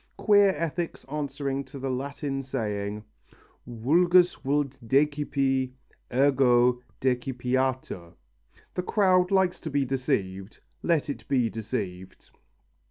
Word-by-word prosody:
Queer 205 -2 +5
ethics 165 +2 -3
answering 140 -2 -3
to 135 +2 -11
the 135 0 -3
Latin 135 +1 -3
saying: 105 -5 -3 0.6
Vulgus 175 +10 +4
vult 140 -1 -2
decipi, 135 -1 +1 0.4
ergo 125 -2 +4 0.2
decipiatur 125 -7 -1 0.6
(The - - -1
crowd 185 -1 +3
likes 190 -2 +2
to 160 - -5
be 140 -1 +1
deceived, 100 -7 -2 0.2
let 165 -4 +1
it 145 - -6
be 125 -5 +1
deceived!). 95 -5 -6
135 Hz, 100 wpm, -27 LUFS, 125-150 Hz, 0.6 s, Queer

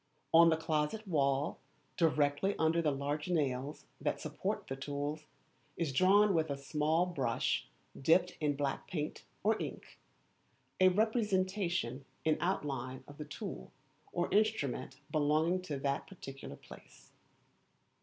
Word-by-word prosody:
On 165 +1 +9
the 160 - +3
closet 160 +7 -1
wall, 140 -3 +1 0.4
directly 155 +3 +2
under 160 +1 +3
the 155 - +2
large 145 +3 -2
nails 140 -4 -1 0.2
that - - 0
support - - -3
the 135 - -4
tools, 145 +2 -4 0.5
is 160 -5 -1
drawn 195 +6 +5
with 160 -2 +1
a 140 - -2
small 150 +4 +1
brush 135 -10 0 0.3
dipped 175 +6 +3
in 150 -2 +1
black 140 -1 -2
paint 155 -3 -4 0.2
or 220 +2 +2
ink, - - -7 0.8
a 185 - +7
representation 190 - +1 0.2
in 155 -1 +4
outline 135 -8 -2
of 145 +1 -13
the 150 - -4
tool 65 - -7 0.4
or 175 +1 -1
instrument 145 - +1
belonging 155 +4 +2
to 155 -6 -4
that 140 +1 -1
particular 135 -8 -9
place. - - -15
155 Hz, 130 wpm, -34 LUFS, 140-180 Hz, 0.8 s, On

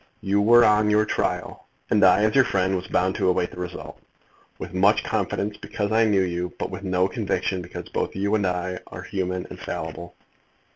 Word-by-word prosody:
You 100 +1 +1
were 120 +3 +6
on 105 0 +4
your 105 0 +3
trial; - - -3 0.2
and 105 - +4
I 95 +2 +6
as 110 0 +2
your 135 - +6
friend 95 -4 0
was 90 0 -4
bound 95 +1 +1
to - - +2
await 90 -1 0
the - - -10
result, 90 0 -7 0.6
with - - -8
much 100 +3 +3
confidence, 105 0 -2
because 105 0 -4
I 115 +1 +4
knew 100 -3 +3
you; 90 0 -3
but - - -4
with 95 0 -6
no 95 -1 +1
conviction, 95 -2 -2
because - - -8
both - - -3
you 100 +2 -1
and 105 -3 +2
I 90 0 -2
are - - -9
human 90 -1 -3
and - - -9
fallible. 85 0 -6
95 Hz, 200 wpm, -24 LUFS, 90-105 Hz, 0.6 s, were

